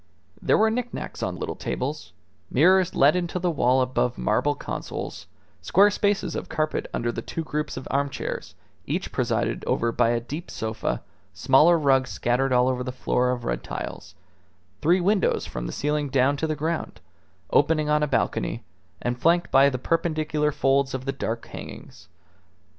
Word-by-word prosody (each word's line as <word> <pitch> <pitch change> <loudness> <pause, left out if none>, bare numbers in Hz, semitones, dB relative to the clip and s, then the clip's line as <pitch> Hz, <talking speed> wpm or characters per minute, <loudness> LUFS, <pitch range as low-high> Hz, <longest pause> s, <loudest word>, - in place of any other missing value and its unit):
There - - +3
were 220 +1 +4
knick 245 +1 -3
knacks - - -6
on - - -2
little - - -3
tables, - - -4 0.4
mirrors 185 -1 +4
let 145 +4 +5
into 180 0 -1
the 180 -1 0
wall 130 -3 +3
above 125 -1 -1
marble 60 - +1
consoles, - - -6 0.3
square 195 - +4
spaces 200 -3 0
of - - -5
carpet 155 0 -1
under 120 0 -1
the - - -5
two 165 - -5
groups 150 -2 -3
of 130 - -6
armchairs, 140 0 -3 0.3
each - - -2
presided - - -1
over 115 0 +1
by 115 - +2
a 120 0 +1
deep 150 +9 -7
sofa; 110 0 -3 0.3
smaller 135 - +5
rugs 135 -4 +3
scattered 130 +3 0
all 125 0 +4
over 125 -1 0
the 125 - -4
floor 125 0 0
of 125 -1 -2
red - - -2
tiles; - - -7 0.7
three 175 +5 +4
windows 195 +2 +2
from - - -5
the - - -4
ceiling 150 0 -1
down 135 +2 +3
to 160 - -1
the 155 - -1
ground, 160 +2 -3 0.5
opening 155 -2 +3
on 150 0 +2
a 150 - +2
balcony, 135 - -1 0.4
and 120 0 -2
flanked 175 +2 +3
by 135 +1 +6
the 130 - -3
perpendicular 155 0 0
folds 135 -1 +1
of 130 0 -5
the 135 - 0
dark 115 -3 -4
hangings. - - -10
140 Hz, 170 wpm, -25 LUFS, 125-165 Hz, 0.7 s, by